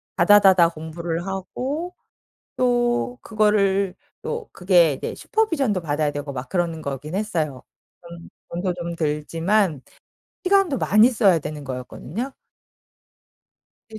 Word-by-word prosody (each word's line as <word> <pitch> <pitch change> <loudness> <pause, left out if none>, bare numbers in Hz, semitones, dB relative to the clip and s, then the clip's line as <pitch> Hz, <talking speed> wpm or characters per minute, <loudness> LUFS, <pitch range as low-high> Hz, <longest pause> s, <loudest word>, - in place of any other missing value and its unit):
다다다다 190 -2 +6
공부를 165 +1 -5
하고 260 - -4 0.6
또 245 0 +1
그거를 200 -3 +1 0.3
또 465 -1 -4
그게 175 -5 +4
이제 - - -5
슈퍼비전도 280 - 0
받아야 150 -1 0
되고 145 0 -5
막 125 0 -6
그러는 170 -3 -1
거긴 140 +4 -5
했어요. 160 -10 -2 0.4
돈 170 0 -11 0.2
돈도 175 +1 -2
좀 170 -1 -5
들지만 165 +2 0 0.6
시간도 380 -7 +3
많이 215 +4 +5
써야 200 -8 +3
되는 150 0 -6
거였거든요. 140 - -6 1.6
예 215 - -6
180 Hz, 255 characters per minute, -23 LUFS, 160-215 Hz, 1.6 s, 다다다다